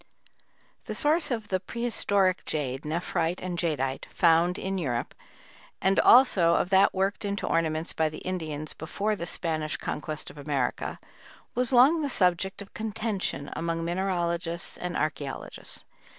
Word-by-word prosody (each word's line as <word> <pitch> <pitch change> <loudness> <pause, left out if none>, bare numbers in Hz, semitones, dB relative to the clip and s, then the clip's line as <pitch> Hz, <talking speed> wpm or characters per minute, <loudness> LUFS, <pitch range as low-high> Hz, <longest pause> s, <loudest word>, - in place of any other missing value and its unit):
The - - -4
source 310 +2 +2
of 225 -5 -3
the 185 - +1
prehistoric 200 -3 +1
jade 135 -2 -2
(nephrite 170 +2 -1
and 180 -1 -4
jadeite) 145 -6 -1
found 170 0 +3
in 190 0 -2
Europe, 120 -8 -2 0.7
and 195 +1 +3
also 190 -10 +6
of 180 - 0
that 195 0 +5
worked 195 +3 0
into 200 0 -2
ornaments 160 0 0
by 160 -1 +1
the 155 - -8
Indians 155 -5 -3
before 205 +7 -2
the 170 -3 -5
Spanish 155 -3 -2
Conquest 155 0 -5
of 150 - -13
America, 140 -4 -2 0.5
was 250 +1 0
long 270 +6 +6
the 290 - -1
subject 190 -2 +1
of 200 - -19
contention 215 -8 -2
among 165 +1 -2
mineralogists 170 -1 -1
and 180 0 -4
archæologists. 145 -3 -3
175 Hz, 140 wpm, -27 LUFS, 155-200 Hz, 0.7 s, also